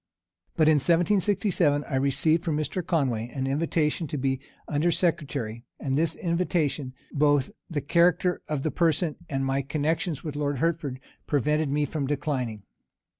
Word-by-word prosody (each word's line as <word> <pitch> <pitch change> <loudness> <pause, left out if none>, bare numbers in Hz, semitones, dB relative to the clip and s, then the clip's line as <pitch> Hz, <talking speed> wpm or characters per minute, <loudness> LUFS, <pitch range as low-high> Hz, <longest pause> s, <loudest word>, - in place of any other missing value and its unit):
But 155 -2 +4
in 155 -1 +6
1767, 175 - +2
I 145 - -9
received 150 +5 +2
from 160 -4 0
Mr. 155 +4 -2
Conway 130 -10 0
an 130 +1 -3
invitation 155 +3 0
to 145 - -4
be 135 -1 0 0.3
under 150 +4 +1
secretary; 145 -10 -1 0.2
and 135 - -2
this 160 +3 +1
invitation, 165 -6 -1 0.2
both 145 -2 +3 0.2
the 150 -4 -2
character 175 +4 +3
of 150 -3 -2
the 155 - 0
person, 165 -2 +1
and 135 -1 -1
my 135 +1 +1
connections 155 +2 -1
with 150 -3 -5
Lord 145 -1 -1
Hertford, 150 -4 -1 0.3
prevented 150 +1 +1
me 145 +1 +1
from 145 -1 -3
declining. 130 -7 -2
150 Hz, 150 wpm, -27 LUFS, 135-165 Hz, 0.3 s, in